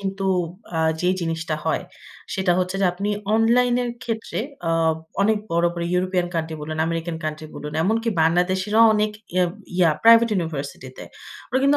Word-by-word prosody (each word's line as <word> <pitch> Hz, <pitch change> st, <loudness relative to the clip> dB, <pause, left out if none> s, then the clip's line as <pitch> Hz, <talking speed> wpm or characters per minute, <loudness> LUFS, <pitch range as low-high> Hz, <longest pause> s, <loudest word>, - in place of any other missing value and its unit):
কিন্তু 195 Hz, 0 st, -3 dB, 0.5 s
আ -, -, 0 dB, 0.2 s
যেই 180 Hz, +1 st, +2 dB
জিনিসটা 165 Hz, -1 st, -2 dB
হয়, -, -, 0 dB, 0.5 s
সেটা 190 Hz, -3 st, +2 dB
হচ্ছে 185 Hz, +1 st, -1 dB
যে, -, -, +3 dB
আপনি 195 Hz, +3 st, -3 dB, 0.3 s
অনলাইনের 245 Hz, +2 st, +3 dB
ক্ষেত্রে 225 Hz, -1 st, -3 dB, 0.3 s
আ -, -, +2 dB, 0.5 s
অনেক 215 Hz, +1 st, +3 dB
বড়, 170 Hz, +1 st, +2 dB
বড় 170 Hz, -1 st, -3 dB
ইউরোপিয়ান 180 Hz, 0 st, +1 dB
কান্ট্রি 160 Hz, -1 st, -2 dB
বলুন, 155 Hz, +1 st, -5 dB
আমেরিকান 165 Hz, 0 st, -3 dB
কান্ট্রি 155 Hz, 0 st, -4 dB
বলুন, 150 Hz, 0 st, -7 dB
এমনকি 225 Hz, +5 st, 0 dB
বাংলাদেশীরাও 185 Hz, +6 st, +3 dB
অনেক 210 Hz, 0 st, +1 dB, 0.2 s
ইয়া, 185 Hz, -1 st, +4 dB, 0.3 s
ইয়া 170 Hz, -3 st, +5 dB
প্রাইভেট 230 Hz, 0 st, +8 dB
ইউনিভার্সিটিতে। 145 Hz, -7 st, -5 dB, 0.4 s
ওরা 255 Hz, -, +1 dB
কিন্তু 280 Hz, +1 st, +4 dB
185 Hz, 155 wpm, -22 LUFS, 165-220 Hz, 0.5 s, প্রাইভেট